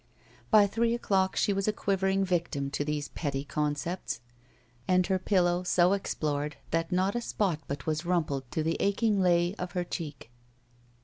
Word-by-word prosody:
By 215 Hz, -2 st, +7 dB
three 230 Hz, +3 st, +1 dB
o'clock 190 Hz, -5 st, +1 dB
she 205 Hz, -, +2 dB
was 195 Hz, +1 st, -1 dB
a -, -, +4 dB
quivering 195 Hz, -1 st, +1 dB
victim 165 Hz, -6 st, -1 dB
to 145 Hz, -, -1 dB
these 150 Hz, -1 st, -2 dB
petty 140 Hz, -3 st, -3 dB
concepts, 150 Hz, +1 st, -2 dB, 0.7 s
and 185 Hz, 0 st, +3 dB
her 190 Hz, 0 st, +1 dB
pillow 180 Hz, -2 st, +2 dB
so 180 Hz, 0 st, +3 dB
explored 150 Hz, -6 st, -2 dB
that 165 Hz, +2 st, 0 dB
not 185 Hz, +2 st, +2 dB
a 240 Hz, -, -1 dB
spot 195 Hz, -8 st, -1 dB
but 140 Hz, +1 st, -5 dB
was 155 Hz, +1 st, -1 dB
rumpled 155 Hz, -7 st, -1 dB
to 160 Hz, -, -1 dB
the 165 Hz, +1 st, 0 dB
aching 200 Hz, 0 st, +2 dB
lay 175 Hz, 0 st, +3 dB
of 180 Hz, 0 st, -4 dB
he 180 Hz, -, 0 dB
cheek. 150 Hz, -8 st, -6 dB
180 Hz, 170 wpm, -29 LUFS, 150-195 Hz, 0.7 s, By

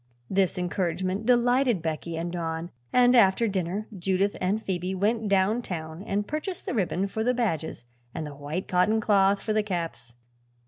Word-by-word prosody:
This 190 Hz, -2 st, +2 dB
encouragement 185 Hz, +3 st, -1 dB
delighted 245 Hz, -4 st, +3 dB
Becky 160 Hz, +1 st, -3 dB
and 170 Hz, +1 st, -3 dB
Don 165 Hz, 0 st, -3 dB, 0.2 s
and 250 Hz, 0 st, +5 dB
after 225 Hz, 0 st, +5 dB
dinner 195 Hz, +1 st, -2 dB
Judith 190 Hz, +2 st, 0 dB
and 190 Hz, +4 st, +1 dB
Phoebe 185 Hz, -2 st, -3 dB
went 215 Hz, +3 st, 0 dB
down 200 Hz, +4 st, +3 dB
town 160 Hz, -5 st, -6 dB
and 205 Hz, 0 st, -2 dB
purchased 310 Hz, +5 st, -4 dB
the -, -, -2 dB
ribbon 195 Hz, -3 st, 0 dB
for 220 Hz, +3 st, -3 dB
the 250 Hz, +2 st, +2 dB
badges 165 Hz, -, -2 dB, 0.3 s
and 155 Hz, -, -5 dB
white 150 Hz, +6 st, -4 dB
cotton 185 Hz, +5 st, +3 dB
cloth 200 Hz, -2 st, +3 dB
for 215 Hz, -, 0 dB
the 215 Hz, -, +3 dB
caps. 165 Hz, -, -4 dB
195 Hz, 165 wpm, -27 LUFS, 175-220 Hz, 0.3 s, and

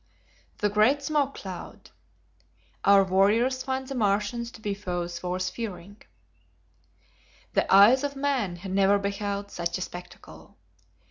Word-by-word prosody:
The 210 Hz, -, +1 dB
Great 235 Hz, +8 st, +3 dB
Smoke 285 Hz, -2 st, 0 dB
Cloud. 185 Hz, -2 st, -9 dB, 0.9 s
Our 200 Hz, 0 st, +6 dB
Warriors 210 Hz, +8 st, +2 dB
Find 265 Hz, 0 st, -3 dB
the 275 Hz, -, -5 dB
Martians 215 Hz, +1 st, 0 dB
to -, -, -12 dB
Be 210 Hz, -2 st, -3 dB
Foes 175 Hz, -3 st, -4 dB
Worth 185 Hz, +1 st, -2 dB
Fearing. 205 Hz, -3 st, -7 dB, 1.5 s
The -, -, +1 dB
eyes 215 Hz, +8 st, +7 dB
of 285 Hz, -1 st, -3 dB
man 270 Hz, -10 st, -1 dB
had 185 Hz, +2 st, -8 dB
never 195 Hz, +1 st, +4 dB
beheld 200 Hz, 0 st, -3 dB
such 170 Hz, +1 st, -3 dB
a -, -, -7 dB
spectacle! 175 Hz, -, -10 dB
200 Hz, 130 wpm, -26 LUFS, 185-245 Hz, 1.5 s, eyes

